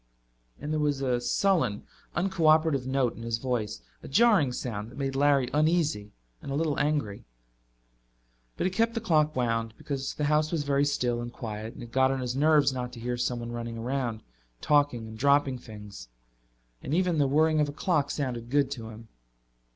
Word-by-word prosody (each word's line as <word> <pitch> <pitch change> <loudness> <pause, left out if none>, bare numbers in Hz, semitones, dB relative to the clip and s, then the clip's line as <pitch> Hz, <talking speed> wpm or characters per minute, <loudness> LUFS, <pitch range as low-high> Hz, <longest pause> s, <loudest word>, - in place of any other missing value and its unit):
And 150 +1 -4
there 155 - 0
was 145 -2 0
a 125 -2 0
sullen, 130 - +1 0.3
uncooperative 160 -6 +2
note 130 -2 +1
in - - -10
his 115 -1 -2
voice, 115 - -3 0.2
a - - -10
jarring 190 - +4
sound 110 -4 -4
that - - -14
made 135 -1 -2
Larry 140 -2 +3
uneasy 150 -9 +1 0.3
and - - -7
a - - -1
little 155 -1 0
angry. 145 -9 -1 1.3
But - - -1
he 185 - +1
kept 230 +4 +1
the - - 0
clock 155 -8 +2
wound, 115 -2 -1
because 135 -2 -4
the 150 - -3
house 150 +1 +2
was 160 -4 0
very 140 0 +2
still 125 -4 0
and 120 0 -6
quiet 110 -1 -6
and - - -9
it 120 - -11
got 130 +1 +3
on 135 0 -1
his 125 0 -3
nerves 145 -1 +4
not 125 -1 -4
to 120 - -9
hear 120 +1 -2
someone 120 -1 -2
running 120 -1 -5
around, 120 -2 -2 0.4
talking 145 - +2
and 110 0 -10
dropping 140 -1 +3
things. 105 - -11 0.7
And 145 - -2
even 180 -3 +1
the 140 - +3
whirring 155 +3 +3
of 150 -1 +2
a - - -4
clock 150 -1 0
sounded 125 -6 -3
good 140 0 +2
to 115 -5 -6
him. 110 +1 -11
135 Hz, 190 wpm, -28 LUFS, 120-150 Hz, 1.3 s, jarring